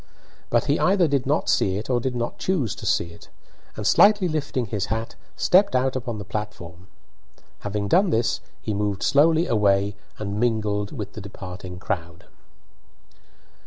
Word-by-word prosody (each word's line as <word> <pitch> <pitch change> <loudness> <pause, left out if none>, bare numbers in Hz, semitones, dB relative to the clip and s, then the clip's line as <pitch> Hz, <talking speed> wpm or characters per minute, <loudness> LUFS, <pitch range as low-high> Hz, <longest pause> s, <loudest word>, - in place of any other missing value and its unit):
But 120 - +2
he 145 +1 +1
either 185 -2 +3
did 140 -3 0
not 150 +3 +1
see 95 0 +2
it 105 - -5
or 125 -2 +1
did 125 +1 -2
not 120 0 -3
choose 155 - 0
to - - -7
see 85 - +1
it, - - -16 0.5
and, 105 - -5
slightly 205 - +5
lifting 145 -6 -2
his 100 -1 -3
hat, 110 +3 -3 0.2
stepped 195 -3 +4
out 130 +1 +1
upon 120 -3 -3
the 100 - -7
platform. 95 -4 -6 0.7
Having 105 0 -3
done 190 - +4
this, 115 -6 +1 0.2
he 110 - -3
moved 100 -1 -1
slowly 160 +4 +4
away 100 - +2 0.2
and 100 -1 -4
mingled 105 -3 0
with 105 -6 -6
the 110 - -7
departing 95 -2 -8
crowd. 85 -3 -4
110 Hz, 160 wpm, -24 LUFS, 100-140 Hz, 0.7 s, slightly